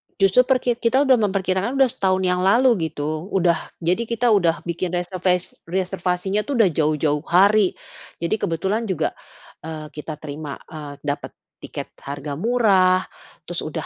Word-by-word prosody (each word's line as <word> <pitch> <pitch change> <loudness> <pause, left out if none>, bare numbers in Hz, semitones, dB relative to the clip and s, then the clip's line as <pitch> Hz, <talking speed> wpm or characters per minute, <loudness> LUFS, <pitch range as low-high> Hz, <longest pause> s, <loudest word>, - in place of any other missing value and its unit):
Justru 195 +6 +4
per 265 -1 +4
ki 245 -1 0
kita 260 +4 +3
udah 260 -4 +4
memperkirakan 195 +3 0
udah 265 -2 +5
setahun 190 -1 0
yang 180 0 +1
lalu, 205 -4 +3
gitu. 155 +3 -4
Udah 175 -3 +1 0.2
jadi 185 +7 0
kita 235 0 +1
udah 175 -5 +2
bikin 175 +1 -3
reserves 180 0 -1
reservasinya 185 +2 -1
itu 285 - -1
sudah 220 -5 +5
jauh-jauh 150 -1 +1
hari. 200 +2 +4 0.5
Jadi 170 - +1
kebetulan 195 +7 -1
juga, 160 -4 -1 0.5
eee, 155 -1 -7
kita 150 0 -6
terima, 150 -1 -7
eee, 150 -2 -8
dapat 145 0 -4 0.3
tiket - - -7
harga 140 +1 -6
murah, 190 -5 +3 0.4
terus - - -4
udah - - -5
185 Hz, 150 wpm, -22 LUFS, 160-215 Hz, 0.5 s, udah